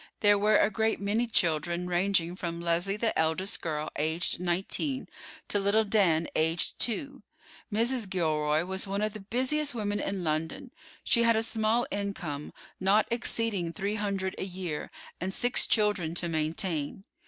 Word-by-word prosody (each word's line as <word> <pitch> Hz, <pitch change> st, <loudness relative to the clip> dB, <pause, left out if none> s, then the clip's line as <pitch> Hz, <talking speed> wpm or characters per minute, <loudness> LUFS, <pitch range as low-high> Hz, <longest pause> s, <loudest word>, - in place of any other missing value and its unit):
There 205 Hz, -1 st, +5 dB
were 210 Hz, +1 st, +4 dB
a -, -, +3 dB
great 220 Hz, +2 st, 0 dB
many 210 Hz, +4 st, 0 dB
children, 170 Hz, -3 st, +1 dB
ranging 180 Hz, -1 st, +1 dB
from 170 Hz, -2 st, -4 dB
Leslie 170 Hz, +4 st, 0 dB
the 225 Hz, +1 st, 0 dB
eldest 160 Hz, +5 st, 0 dB
girl, 155 Hz, -2 st, -3 dB
aged 160 Hz, +4 st, 0 dB
nineteen, 190 Hz, -, -1 dB, 0.4 s
to 205 Hz, -, +1 dB
little 200 Hz, +3 st, +3 dB
Dan, 190 Hz, -6 st, +2 dB
aged 160 Hz, +2 st, +1 dB
two. 245 Hz, +4 st, 0 dB, 0.5 s
Mrs. 230 Hz, 0 st, 0 dB
Gilroy 155 Hz, -3 st, +1 dB
was 190 Hz, +2 st, -3 dB
one 200 Hz, +2 st, -1 dB
of 215 Hz, -1 st, -1 dB
the 215 Hz, -, -7 dB
busiest 260 Hz, +7 st, -1 dB
women 205 Hz, -2 st, -1 dB
in 195 Hz, -2 st, -2 dB
London. 160 Hz, -, -2 dB, 0.3 s
She 235 Hz, -, +3 dB
had 230 Hz, -1 st, +4 dB
a 220 Hz, -, +2 dB
small 225 Hz, +1 st, +1 dB
income, 190 Hz, -8 st, -4 dB, 0.3 s
not 195 Hz, +3 st, +4 dB
exceeding 225 Hz, -7 st, 0 dB
three 200 Hz, +5 st, -2 dB
hundred 200 Hz, -3 st, -2 dB
a -, -, -2 dB
year, 180 Hz, -5 st, -5 dB, 0.3 s
and 185 Hz, +2 st, -2 dB
six 245 Hz, +5 st, +2 dB
children 205 Hz, -7 st, +2 dB
to 175 Hz, -, -2 dB
maintain. 160 Hz, +1 st, -1 dB
195 Hz, 155 wpm, -29 LUFS, 170-215 Hz, 0.5 s, There